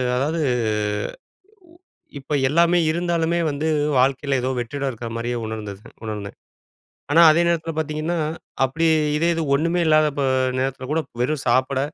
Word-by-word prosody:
அதாவது 155 +6 -1 1.3
உ - - -20 0.5
இப்ப 140 +2 -6 0.2
எல்லாமே 170 +4 +3
இருந்தாலுமே 170 0 0
வந்து 150 +2 -2 0.3
வாழ்க்கையில 135 +1 +1
ஏதோ 130 - -1
வெற்றிடம் 135 +3 -3
இருக்கிற 115 -1 -7
மாதிரியே 120 +1 -2
உணர்ந்தது 105 -2 -6 0.2
உணர்ந்தேன். 105 -2 -6 0.8
ஆனா 165 +3 +6
அதே 165 - +3
நேரத்தில 165 -1 -1
பார்த்தீங்கன்னா, 155 +2 -2 0.5
அப்டி 165 +5 0 0.3
இதே 170 +2 +1
இது 165 - -1
ஒண்ணுமே 165 +4 0
இல்லாதப்ப 150 -2 +3 0.4
நேரத்தில 130 0 -3
கூட 160 +1 +1 0.2
வெறும் 145 +3 -1
சாப்பிட, 130 +2 +2
145 Hz, 130 wpm, -22 LUFS, 130-165 Hz, 1.3 s, ஆனா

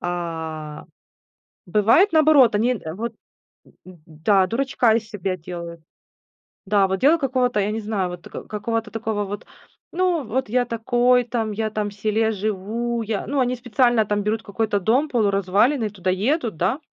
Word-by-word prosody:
А. 160 -3 -5 0.8
Бывает 225 - +4
наоборот, 305 -8 +5
они, 235 +4 +2
э, 160 -7 -7
вот, 230 +3 -4 0.5
м - - -21
м 185 - -12
м, 160 -4 -22
да, 185 +5 +2
дурочка 245 0 +1
из 225 -1 -2
себя 190 -3 -3
делают. 170 0 -8 0.9
Да, 200 0 +3
вот 190 0 -2
дело 305 +5 +5
какого-то, 255 -5 0
я 200 0 0
не 220 - -2
знаю, 205 -4 -2
вот, 180 -1 -9
э, - - -8
какого-то 220 +1 -3
такого 220 -1 -2
вот: 205 +1 -7 0.5
"Ну 355 -3 0
вот 255 +3 -2
я 245 +1 +1
такой 245 +2 +2
там, 230 -2 -2
я 215 +1 -2
там 210 -1 -2
в - - -13
селе 215 +2 0
живу. 215 +4 -2
Я" 215 -1 -3
Ну, 285 - -1
они 250 0 0
специально 240 -1 +2
там 205 0 -1
берут 215 +2 -1
какой-то 210 0 -1
дом 250 +10 +1
полуразваленный, 210 +2 +2
туда 190 -3 -4
едут, 230 - 0
да, 190 - 0
215 Hz, 170 wpm, -22 LUFS, 195-245 Hz, 0.9 s, наоборот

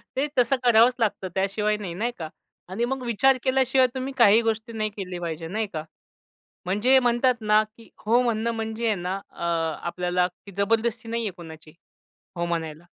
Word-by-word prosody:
ते 275 +3 0
तसं 250 +2 +4
करावंच 240 +1 +5
लागतं 210 -4 0
त्याशिवाय 210 +2 0
नाही, 195 -5 -6
नाही 225 +7 -2
का? 160 -2 -6 0.4
आणि 215 +6 -1
मग 265 +1 -3
विचार 255 +3 +3
केल्याशिवाय 260 -1 +3
तुम्ही 260 +1 -4
काही 220 -1 +6
गोष्टी 225 0 -2
नाही 215 -1 -1
केली 185 -3 -6
पाहिजे, 165 -1 -5
नाही 215 +4 -2
का? 155 - -3 0.8
म्हणजे 210 +8 +3
म्हणतात 245 +1 +2
ना 210 0 +4 0.2
की 230 - -16 0.2
हो 235 +3 +4
म्हणणं 235 -1 0
म्हणजे 225 0 -4
आहे 215 - +2
ना 180 +1 -3 0.2
अ, - - -9 0.4
आपल्याला 180 0 0
की 190 +3 -16
जबरदस्ती 225 +2 0
नाहीये 230 -3 -2
कुणाची 160 -3 -12 0.7
हो 170 - -1
म्हणायला. 165 -2 -3
220 Hz, 170 wpm, -25 LUFS, 185-235 Hz, 0.8 s, काही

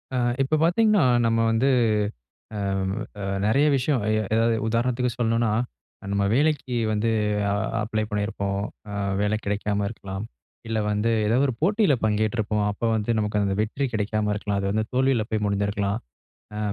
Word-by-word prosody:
அ - - +1 0.2
இப்ப 135 +4 +1
பார்த்தீங்கன்னா, 205 0 +4 0.2
நம்ம 115 0 +2
வந்து 115 +5 +2 0.9
அ - - -3 0.6
அ - - -4 0.2
நெறைய 135 +8 +3
விஷயம் 135 -2 0
எ - - +2 0.2
எதாவது 115 0 +3
உதாரணத்துக்கு 120 +2 0
சொல்லணும்னா, 115 -1 +1 0.6
நம்ம 100 0 +1
வேலைக்கு 140 -3 +1 0.2
வந்து 110 +2 +1 0.4
அ - - +1 0.3
அப்ளை 110 0 -1
பண்ணியிருப்போம், 100 -1 -2 0.3
அ - - -6 0.3
வேலை 105 +1 +1
கெடைக்காம 100 0 -1
இருக்கலாம். 100 -2 -6 0.4
இல்ல 110 -1 -1
வந்து 105 +2 +1 0.2
ஏதோ 115 +4 +2
ஒரு 130 - -2
போட்டியில 200 -2 +3
பங்கேற்றிப்போம், 105 0 0
அப்போ 105 +3 -2
வந்து 110 +1 -2
நமக்கு 105 -1 0
அந்த 95 -1 0
வெற்றி 135 +6 -2
கெடைக்காம 105 0 0
இருக்கலாம். 100 -1 -2
அது 100 0 -1
வந்து 110 +1 0
தோல்வில 130 -3 +2
போய் 110 -1 0
முடிஞ்சிருக்கலாம், 100 0 0 0.6
அ - - -4
110 Hz, 150 wpm, -24 LUFS, 105-125 Hz, 0.9 s, பார்த்தீங்கன்னா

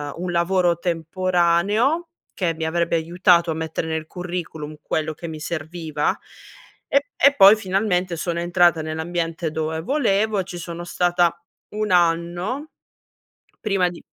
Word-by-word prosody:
un 175 +1 -4
lavoro 175 0 +2
temporaneo 185 - +1 0.3
che 170 -4 -1
mi 160 0 -3
avrebbe 170 +1 0
aiutato 170 +1 +3
a - - 0
mettere 160 0 -3
nel 160 -1 -3
curriculum 170 -4 -6
quello 155 0 -2
che 170 +2 -8
mi 155 -1 -7
serviva 155 -1 -2 0.7
e 280 - +3 0.2
e 280 +1 +6
poi 200 -1 +8
finalmente 185 -3 0
sono 170 +1 -2
entrata 175 -2 +3
nell'ambiente 165 +1 -3
dove 160 +1 -2
volevo 215 - +1
e - - 0
ci 180 -2 -7
sono 170 0 -6
stata 175 -1 +1 0.3
1 210 0 -3
anno, 175 - +1 0.9
prima 195 -4 +1
di 175 - -11
175 Hz, 135 wpm, -22 LUFS, 165-185 Hz, 0.9 s, poi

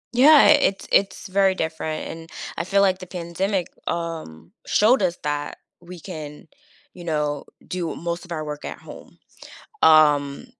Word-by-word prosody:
Yeah, 275 +6 +7
i - - +8
it's 195 -7 0
it's 195 +1 +1
very 190 0 +2
different, 160 -1 -3
and 165 0 -9 0.3
I 170 - -3
feel 200 +2 +2
like 190 -1 +2
the 185 - -9
pandemic, 180 +2 -3 0.2
um, 165 - -5
showed 225 +4 +3
us 180 -2 0
that 145 0 -3 0.2
we 175 0 -11
can, 155 -5 -9 0.5
you 175 - -11
know, 150 -3 -2 0.2
do 175 -3 -3
most 170 +1 -4
of 175 - -14
our 155 -2 -3
work 150 -1 -6
at - - -6
home. - - -13 0.6
Um, 150 - +4
170 Hz, 160 wpm, -23 LUFS, 155-185 Hz, 0.6 s, i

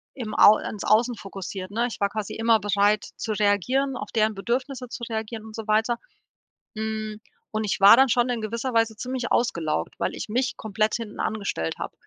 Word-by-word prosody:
im 225 -5 -5
Au 210 - +8
ins 205 - -6
Außen 235 +3 +3
fokussiert, 190 -1 -7
ne? 230 +3 0
Ich 240 - -8
war 200 - +2
quasi 215 -1 -4
immer 225 0 +3
bereit, 205 +1 +2
zu 220 - -2
reagieren, 215 +7 +1
auf - - -6
deren 220 -1 +2
Bedürfnisse 250 +5 -3
zu 240 - -7
reagieren 220 -1 -4
und 220 -1 -10
so 225 -1 -7
weiter. 220 +2 +2 0.8
Hm, 215 0 -4 0.3
und 215 0 -2
ich 200 - -1
war 200 +3 +9
dann 265 +2 +5
schon 240 +1 +3
in 245 -2 -1
gewisser 235 +4 -3
Weise 225 -1 +2
ziemlich 250 +1 -3
ausgelaugt, 160 - 0
weil - - -1
ich - - -6
mich 250 +4 -1
komplett 215 0 -1
hinten 225 -3 -7
angestellt 200 - -2
hab - - -5
220 Hz, 195 wpm, -25 LUFS, 205-235 Hz, 0.8 s, war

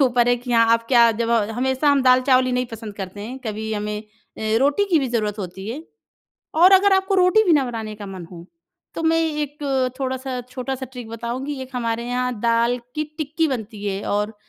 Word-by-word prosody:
के - - +6
ऊपर 245 -1 +2
है 245 - +5
कि 245 0 -5
हाँ 230 -1 +5
आप 230 0 +1
क्या 235 -3 +6
जब 230 - 0
अ, 225 -2 +1
हमेशा 260 +4 0
हम 285 -1 +4
दाल-चावल 255 0 +4
ही 255 - -1
नहीं 250 0 0
पसंद 225 -2 -8
करते 195 0 -7
हैं, 240 +6 -6
कभी 220 0 -4
हमें 210 0 -3
अ, 220 0 -5
रोटी 285 +9 +2
की 335 - +5
भी 270 -3 -1
ज़रूरत 215 -3 -1
होती 190 +1 -6
है। 265 +8 -5 0.7
और 355 +4 +6
अगर 390 +1 +6
आपको 385 +1 +2
रोटी 370 +3 +5
भी 355 - +4
ना 290 -3 +4
बनाने 225 -3 -5
का 205 -1 -9
मन 190 -2 -8
हो, 170 -1 -11 0.5
तो - - -4
मैं 325 0 +3 0.3
एक 295 0 -6 0.4
थोड़ा-सा, 260 -1 -3
छोटा-सा 260 +1 -4
ट्रिक 245 -3 -8
बताऊँगी, 240 +5 -4
एक 260 - -10
हमारे 235 -1 -2
यहाँ 250 -1 -1
दाल 235 +1 +2 0.2
की 305 - -1
टिक्की 315 +1 0
बनती 220 -5 -5
है 195 0 -2
और 210 +2 -1
245 Hz, 215 wpm, -22 LUFS, 220-270 Hz, 0.7 s, के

